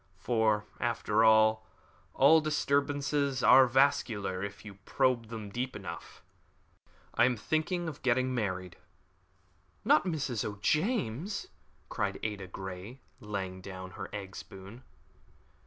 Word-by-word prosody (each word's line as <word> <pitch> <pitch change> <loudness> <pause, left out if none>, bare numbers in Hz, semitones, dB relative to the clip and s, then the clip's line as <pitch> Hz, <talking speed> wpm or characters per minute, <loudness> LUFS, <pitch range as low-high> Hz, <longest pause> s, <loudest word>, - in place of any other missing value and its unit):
For, 110 -3 +1
after 115 -2 +1
all, 110 0 +5 0.5
all 155 +4 +6
disturbances 145 -2 0
are 130 -1 +8
vascular 120 -8 +1
if 100 +2 -7
you 100 -2 -11
probe 130 -2 +1
them 110 -3 -7
deep 125 +4 -3
enough. - - -9 0.9
I 120 - +4
am 125 -1 +1
thinking 160 - -1
of 155 - -7
getting 130 +1 +1
married." 95 -6 -3 1.1
"Not 155 - +4
Mrs. 140 - -2
O'James" 155 - -1 0.4
cried - - -2
Ada 105 -3 -4
Grey, 95 +6 -8 0.2
laying 95 -4 -5
down 95 0 -8
her - - -7
egg 100 -2 -7
spoon. 95 +5 -10
115 Hz, 115 wpm, -30 LUFS, 100-140 Hz, 1.1 s, are